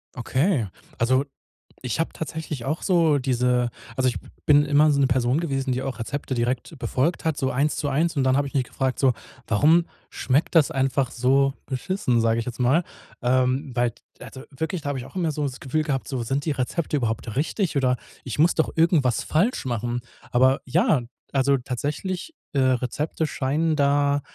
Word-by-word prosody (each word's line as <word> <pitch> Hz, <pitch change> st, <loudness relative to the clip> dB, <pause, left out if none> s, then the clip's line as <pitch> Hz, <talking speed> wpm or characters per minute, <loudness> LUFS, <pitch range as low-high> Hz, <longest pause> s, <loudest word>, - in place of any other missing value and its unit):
Okay, 130 Hz, -, +1 dB, 0.3 s
also, 130 Hz, +4 st, +2 dB, 0.6 s
ich 125 Hz, +3 st, -3 dB
habe 165 Hz, -, 0 dB
tatsächlich 155 Hz, -4 st, -5 dB
auch 150 Hz, +6 st, -2 dB
so 165 Hz, -6 st, +3 dB
diese 125 Hz, -2 st, +1 dB, 0.3 s
also, 130 Hz, -1 st, +2 dB
ich 125 Hz, -, 0 dB, 0.3 s
bin 145 Hz, 0 st, +6 dB
immer 150 Hz, +1 st, +4 dB
so 140 Hz, -1 st, +2 dB
'ne 135 Hz, -, +4 dB
Person 130 Hz, +3 st, +1 dB
gewesen, 135 Hz, -5 st, -1 dB
die 130 Hz, -, -2 dB
auch 130 Hz, -2 st, -4 dB
Rezepte 140 Hz, +3 st, -4 dB
direkt 125 Hz, +4 st, -2 dB
befolgt 135 Hz, +8 st, -1 dB
hat, 160 Hz, -2 st, +1 dB
so 130 Hz, -2 st, -1 dB
1 145 Hz, +4 st, +1 dB
zu 145 Hz, -2 st, -2 dB
1 160 Hz, +4 st, +1 dB
und 140 Hz, -, +1 dB
dann 130 Hz, +1 st, +3 dB
habe 140 Hz, -, +1 dB
ich 140 Hz, -, -11 dB
mich 135 Hz, -, +2 dB
gefragt 130 Hz, +1 st, -2 dB
so: 130 Hz, -2 st, +4 dB, 0.3 s
„Warum 155 Hz, +10 st, +4 dB, 0.2 s
schmeckt 140 Hz, +6 st, 0 dB
das 155 Hz, -4 st, +5 dB
einfach 135 Hz, -1 st, 0 dB
so 135 Hz, +2 st, +2 dB
beschissen?”, 130 Hz, -3 st, 0 dB
sage 115 Hz, 0 st, +2 dB
ich 115 Hz, -, -3 dB
jetzt 125 Hz, 0 st, -6 dB
mal. 140 Hz, +8 st, +3 dB, 0.4 s
Ähm, 130 Hz, +3 st, +1 dB
weil 120 Hz, -1 st, +2 dB, 0.3 s
also 130 Hz, +1 st, -9 dB
wirklich, 160 Hz, +4 st, -3 dB
da 145 Hz, -, -3 dB
habe 135 Hz, -2 st, -2 dB
ich 120 Hz, -, -7 dB
auch -, -, -10 dB
immer 165 Hz, -3 st, +1 dB
so 150 Hz, 0 st, -3 dB
das 130 Hz, -3 st, -3 dB
Gefühl 155 Hz, +4 st, -1 dB
gehabt, 135 Hz, -4 st, -2 dB
so, 130 Hz, -3 st, -3 dB
sind 135 Hz, +4 st, -2 dB
die 160 Hz, -, +1 dB
Rezepte 145 Hz, +4 st, -2 dB
überhaupt 115 Hz, -3 st, -2 dB
richtig? 165 Hz, -, -1 dB
Oder 130 Hz, -2 st, +2 dB, 0.3 s
ich 130 Hz, +2 st, -5 dB
muss 170 Hz, +3 st, +4 dB
doch 160 Hz, -, +1 dB
irgendwas 155 Hz, -7 st, +3 dB
falsch 185 Hz, -, +1 dB
machen? 120 Hz, 0 st, -2 dB, 0.3 s
Aber 130 Hz, +2 st, +4 dB
ja, 150 Hz, 0 st, +2 dB, 0.3 s
also 140 Hz, 0 st, +3 dB
tatsächlich 150 Hz, -, -4 dB, 0.2 s
äh, 140 Hz, -, +1 dB
Rezepte 130 Hz, +5 st, 0 dB
scheinen 155 Hz, +3 st, 0 dB
da 145 Hz, 0 st, +2 dB
135 Hz, 190 wpm, -24 LUFS, 125-150 Hz, 0.6 s, bin